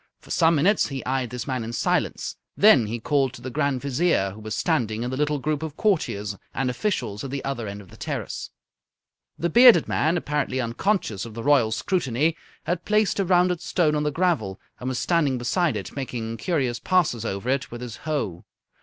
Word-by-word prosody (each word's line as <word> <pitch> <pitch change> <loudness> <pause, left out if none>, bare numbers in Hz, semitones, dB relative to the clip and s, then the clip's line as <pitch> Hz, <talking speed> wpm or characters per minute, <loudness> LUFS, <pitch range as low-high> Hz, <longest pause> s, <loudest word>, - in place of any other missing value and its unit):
For - - -14
some 165 -1 +4
minutes 190 +8 +3
he 135 -2 -6
eyed 130 -1 -1
this 125 +1 -5
man 130 -4 -2
in 115 +1 -6
silence, - - -1 0.2
then 145 - +6
he 115 +2 -3
called 135 +1 +1
to - - -11
the 130 - -5
Grand 140 -2 0
Vizier, 140 - +1
who 105 - -11
was 110 0 -5
standing 110 0 0
in 125 - -3
the - - -2
little 150 +1 0
group 150 +1 -2
of 160 -2 -6
courtiers 105 - 0 0.2
and 130 -2 0
officials 120 - -2
at 135 - -5
the 140 +1 -4
other 135 -5 -3
end 100 +1 -6
of 95 - -16
the - - -14
terrace. - - -4 0.9
The 170 0 -1
bearded 240 -7 +7
man, 160 +4 +1
apparently 150 -4 -1
unconscious 115 - -1
of 115 -2 -8
the 115 - -5
Royal 135 -6 +4
scrutiny, 155 - 0 0.3
had 175 0 -2
placed 210 -1 +2
a 195 - +2
rounded 180 -1 +3
stone 165 -2 +1
on 150 - +1
the 150 - +1
gravel, 145 - 0 0.2
and 125 - -3
was 130 - -2
standing 150 -6 +1
beside 125 - 0
it 100 - -7
making 115 -4 -4
curious 130 -4 -1
passes 165 - +1
over 100 0 -4
it 135 0 0
with 120 0 -8
his 120 -3 -6
hoe. 110 - -3
135 Hz, 205 wpm, -24 LUFS, 115-165 Hz, 0.9 s, bearded